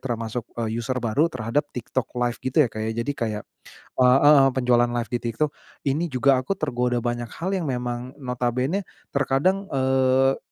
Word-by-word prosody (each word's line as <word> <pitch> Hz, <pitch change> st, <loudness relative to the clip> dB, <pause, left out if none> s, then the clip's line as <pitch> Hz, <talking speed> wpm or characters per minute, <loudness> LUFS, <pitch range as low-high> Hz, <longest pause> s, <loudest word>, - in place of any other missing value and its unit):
termasuk 120 Hz, -1 st, -4 dB, 0.2 s
user 115 Hz, +3 st, -2 dB
baru 125 Hz, +6 st, +1 dB
terhadap 130 Hz, +3 st, -2 dB
TikTok 120 Hz, +1 st, -2 dB
LIVE 120 Hz, -1 st, 0 dB
gitu 130 Hz, +2 st, -4 dB
ya 120 Hz, -, -1 dB
Kak, 110 Hz, -, -5 dB
ya. -, -, -1 dB
Jadi, 145 Hz, -, -1 dB
kayak 110 Hz, -5 st, -3 dB, 0.6 s
eee 125 Hz, 0 st, +6 dB
heeh 145 Hz, -2 st, +7 dB
penjualan 125 Hz, -2 st, +3 dB
live 120 Hz, -1 st, -2 dB
di 120 Hz, -, 0 dB
TikTok. 120 Hz, +6 st, -1 dB, 0.4 s
Ini 155 Hz, +6 st, 0 dB
juga 130 Hz, +1 st, +4 dB
aku 130 Hz, +9 st, -1 dB
tergoda 125 Hz, -7 st, -1 dB
banyak 120 Hz, -1 st, -3 dB
hal, 180 Hz, +3 st, -3 dB
yang 175 Hz, -, -3 dB
memang 125 Hz, -1 st, -3 dB
notabene-nya 125 Hz, +8 st, -1 dB, 0.2 s
terkadang, 140 Hz, +9 st, +1 dB
eee, 130 Hz, 0 st, +3 dB
125 Hz, 165 wpm, -24 LUFS, 120-135 Hz, 0.6 s, heeh